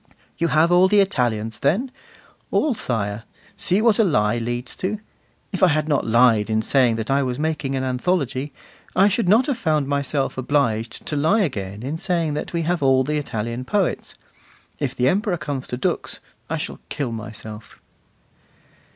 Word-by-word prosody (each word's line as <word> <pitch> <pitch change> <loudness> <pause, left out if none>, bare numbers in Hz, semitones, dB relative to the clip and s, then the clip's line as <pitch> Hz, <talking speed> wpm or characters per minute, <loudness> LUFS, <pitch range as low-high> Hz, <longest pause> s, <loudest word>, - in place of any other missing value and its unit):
'You 170 - +2
have 160 +2 +3
all 180 +1 +6
the 205 +2 +4
Italians, 115 - 0
then?' 210 - +1 0.6
'All, 300 - +2
sire.' 105 - -2 0.3
See 195 +4 +1
what 230 -2 +4
a - - +6
lie 115 - +2
leads 120 +1 -3
to. 205 +3 -2 0.5
If 190 - -3
I 185 - +7
had 155 -2 +1
not 145 -6 +1
lied 115 -2 +4
in 110 0 +1
saying 125 -2 +3
that 110 +3 -3
I 140 +1 +3
was 125 -2 -2
making 150 -3 -1
an 130 - -1
anthology, 130 +1 -1 0.4
I 195 +2 +6
should 205 -2 +1
not 225 +6 +5
have 275 -4 -2
found 155 -8 +1
myself 140 -1 -1
obliged 120 -4 0
to 150 - -3
lie 160 +10 +3
again 105 - -3
in 150 +5 -3
saying 170 -5 0
that 150 - -4
we 170 -1 -1
have 175 +1 0
all 135 -1 +4
the 150 +3 -1
Italian 115 -3 -3
poets. 195 +7 -1 0.6
If - - -2
the 125 - +2
Emperor 195 - +1
comes 140 -4 -4
to 125 - -4
Dux, 125 - -2 0.3
I - - -1
shall - - -5
kill 140 -5 -3
myself. 110 -1 -8
140 Hz, 175 wpm, -22 LUFS, 120-175 Hz, 0.6 s, I